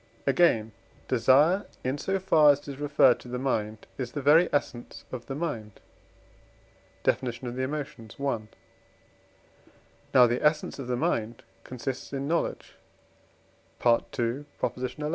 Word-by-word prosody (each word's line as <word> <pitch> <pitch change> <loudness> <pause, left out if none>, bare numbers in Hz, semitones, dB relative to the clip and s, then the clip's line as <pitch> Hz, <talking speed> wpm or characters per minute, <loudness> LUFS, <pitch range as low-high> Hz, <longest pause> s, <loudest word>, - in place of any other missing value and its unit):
Again, 135 -7 +3 0.4
desire, 140 - +4 0.2
in 130 +3 -2
so 195 +5 -1
far 165 -6 +5
as 145 0 +4
it 145 - -11
is 140 -1 -7
referred 145 -4 +4
to - - -13
the 125 +1 -4
mind, 110 -5 -2
is 125 -2 -4
the 145 - -3
very 160 +5 +6
essence 120 -4 -3
of 125 -2 -7
the 135 - -4
mind 120 -10 -4 1.2
(Def. - - +2
of 120 0 -5
the 130 - -2
Emotions, 135 -5 -5
i.); 140 -4 0 1.7
now 125 -1 +7
the 120 +1 0
essence 150 -1 +1
of 130 - -6
the 125 -1 -1
mind 115 -1 -1 0.2
consists 130 +2 -6
in 140 0 -3
knowledge 170 +2 -2 1.1
(II. 120 +3 +1 0.5
xi.) 150 - -6
130 Hz, 140 wpm, -27 LUFS, 120-145 Hz, 1.7 s, now